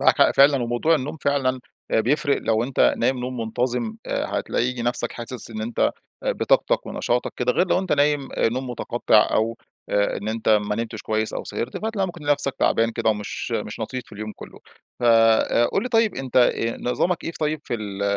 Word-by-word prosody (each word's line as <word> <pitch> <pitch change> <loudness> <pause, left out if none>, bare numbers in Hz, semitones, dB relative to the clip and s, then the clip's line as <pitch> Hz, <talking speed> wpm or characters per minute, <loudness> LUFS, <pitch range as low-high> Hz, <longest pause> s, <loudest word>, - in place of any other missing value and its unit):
معاكَ - - +4
حق - - +6
فعلًا، 140 -2 +5
وموضوع 120 +7 +2
النوم 150 +1 -3
فعلًا 135 -3 0 0.3
آآ - - +3
بيفرق، 140 +4 +1
لو 110 0 +1
أنت 130 +1 +3
نايم 125 +2 +1
نوم 125 +1 -4
منتظم 120 0 -1
آآ - - -1
هتلاقي 125 0 -1
نفسك 120 +1 -1
حاسس 120 0 -7
إن 110 -1 -5
أنت 115 +1 -4 0.4
آآ - - +1
بطاقتك - - +1
ونشاطك 120 +1 -1
كده، 125 0 +1
غير 180 - +2
لو - - +3
أنت 190 -1 -1
نايم 145 -1 +2
آآ - - +2
نوم 125 +2 -4
متقطع، 120 -2 +2
أو 115 +1 +1 0.3
آآ 100 0 +1
إن 105 - -5
أنت 110 0 -2
ما 105 -1 +3
نمتش 115 -1 -4
كويّس، 110 0 -1
أو - - -4
سهرت. 120 +2 -4
فهتلاقي 215 -3 -1
ممكن 175 -3 -9
نفسك 145 -2 +1
تعبان 115 0 +2
كده 115 -1 +1
ومش 105 -1 -4
مش - - -3
لطيف 130 -1 -4
في - - -20
اليوم 110 +1 -6
كلّه. - - -11 0.4
فآآ 115 0 +4
قُل 195 - 0
لي 250 - -3
طيّب 225 -3 +2
أنت 130 -1 -5
آآ 115 -2 +3
نظامك 170 +8 0
إيه - - -2
ف - - -10
طيّب 155 0 0
في - - -3
ال 100 -3 -5
120 Hz, 205 wpm, -23 LUFS, 115-140 Hz, 0.4 s, حق